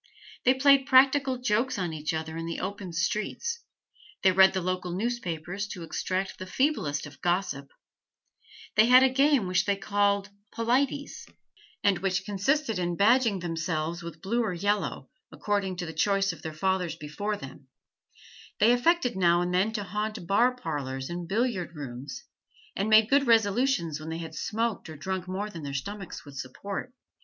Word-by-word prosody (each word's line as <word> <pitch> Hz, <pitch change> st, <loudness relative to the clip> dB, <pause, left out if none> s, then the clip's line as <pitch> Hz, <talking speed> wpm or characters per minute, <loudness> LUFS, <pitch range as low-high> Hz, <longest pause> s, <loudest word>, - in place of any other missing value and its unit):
They 255 Hz, +1 st, +5 dB
played 275 Hz, 0 st, +5 dB
practical 265 Hz, 0 st, +5 dB
jokes 245 Hz, 0 st, 0 dB
on 175 Hz, -4 st, -2 dB
each 155 Hz, 0 st, -3 dB
other 160 Hz, 0 st, -4 dB
in 165 Hz, 0 st, -4 dB
the 165 Hz, -, -4 dB
open 200 Hz, -3 st, -5 dB
streets; 215 Hz, -, -2 dB, 0.6 s
they 190 Hz, -, +6 dB
read 190 Hz, +1 st, +6 dB
the 190 Hz, -, 0 dB
local 185 Hz, 0 st, -2 dB
newspapers 190 Hz, -3 st, -3 dB
to 180 Hz, -4 st, -7 dB
extract 185 Hz, +4 st, -3 dB
the 185 Hz, -, -6 dB
feeblest 185 Hz, -, 0 dB
of 145 Hz, 0 st, -13 dB
gossip; 175 Hz, -6 st, -1 dB, 1.1 s
they 215 Hz, +1 st, +6 dB
had 255 Hz, +1 st, +8 dB
a 265 Hz, -, +4 dB
game 275 Hz, -4 st, +4 dB
which 180 Hz, 0 st, +1 dB
they 200 Hz, -, +2 dB
called 200 Hz, 0 st, 0 dB, 0.2 s
polities, 265 Hz, +5 st, -1 dB, 0.6 s
and 200 Hz, -3 st, +3 dB
which 190 Hz, 0 st, -1 dB
consisted 225 Hz, +4 st, 0 dB
in 175 Hz, -1 st, -1 dB
badging 220 Hz, -2 st, +3 dB
themselves 165 Hz, -1 st, -2 dB
with 170 Hz, 0 st, -9 dB
blue 230 Hz, +5 st, +1 dB
or 215 Hz, -5 st, -1 dB
yellow, 200 Hz, -6 st, -1 dB, 0.2 s
according 200 Hz, -3 st, -1 dB
to 175 Hz, 0 st, -4 dB
the 160 Hz, -, -6 dB
choice 195 Hz, +2 st, +1 dB
of -, -, -13 dB
their 160 Hz, -, -5 dB
fathers 180 Hz, +2 st, -1 dB
before 205 Hz, +8 st, -4 dB
them; 135 Hz, -2 st, -11 dB, 0.9 s
they 220 Hz, +3 st, +6 dB
affected 250 Hz, -, +2 dB
now 175 Hz, -2 st, +4 dB
and 175 Hz, 0 st, -1 dB
then 190 Hz, +4 st, +2 dB
to 210 Hz, -2 st, -2 dB
haunt 210 Hz, 0 st, -4 dB
bar 240 Hz, +7 st, +3 dB
parlours 140 Hz, -, -4 dB
and 175 Hz, 0 st, -5 dB
billiard 195 Hz, -5 st, -1 dB
rooms, 135 Hz, -1 st, -7 dB, 0.5 s
and 200 Hz, +3 st, -1 dB
made 215 Hz, 0 st, +6 dB
good 280 Hz, +2 st, +3 dB
resolutions 220 Hz, -, +2 dB
when 155 Hz, +1 st, -7 dB
they 160 Hz, -, -3 dB
had 165 Hz, -1 st, -7 dB
smoked 225 Hz, 0 st, -2 dB
or 155 Hz, -, -8 dB
drunk 190 Hz, +3 st, -4 dB
more 190 Hz, +3 st, -3 dB
than 165 Hz, -, -8 dB
their 140 Hz, -2 st, -5 dB
stomachs 195 Hz, +6 st, -6 dB
would 145 Hz, -1 st, -12 dB
support. 195 Hz, -, -6 dB
195 Hz, 170 wpm, -28 LUFS, 170-230 Hz, 1.1 s, had